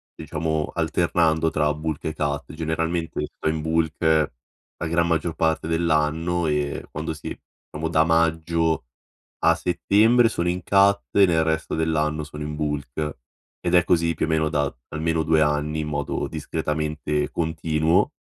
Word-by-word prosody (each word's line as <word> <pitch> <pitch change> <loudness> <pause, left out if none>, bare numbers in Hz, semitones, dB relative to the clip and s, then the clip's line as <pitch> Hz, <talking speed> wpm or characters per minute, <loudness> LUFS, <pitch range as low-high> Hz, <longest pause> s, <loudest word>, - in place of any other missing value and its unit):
diciamo 80 -1 -2
alternando 80 -1 +2
tra 75 -1 +1
bulk 75 0 -4
e 80 - -1
cut 75 -1 -3
generalmente 80 +1 -2
tipo 80 - -4
in 80 0 -1
bulk 80 0 0 0.8
la 80 - -3
gran 85 +1 +2
maggior 85 0 0
parte 80 -1 0
dell'anno, 80 +1 +1
eh, 75 -1 -1
quando 80 +1 -4
sì, 80 - -7 0.3
diciamo, 80 +1 -3
da 80 -1 +4
maggio 80 -1 +1 0.6
a 85 - +5
settembre 105 +8 +3
sono 85 -6 -1
in 90 +1 -1
cut 100 +1 +4
e 100 -1 +6
nel 80 -2 +2
resto 80 0 -1
dell'anno 75 -1 0
sono 75 0 -8
in 75 0 -4
bulk 75 -1 -3 0.4
ed 85 - -1
è 85 -1 +6
così 85 -1 +2
più - - -1
o - - -6
meno 80 -1 +2
da 75 -3 -1
almeno 80 +1 -1
2 80 0 +3
anni, 75 +1 0
in 75 - -3
modo 75 - -2
discretamente 75 -1 -2
continuo. 80 - +1
80 Hz, 155 wpm, -24 LUFS, 75-85 Hz, 0.8 s, e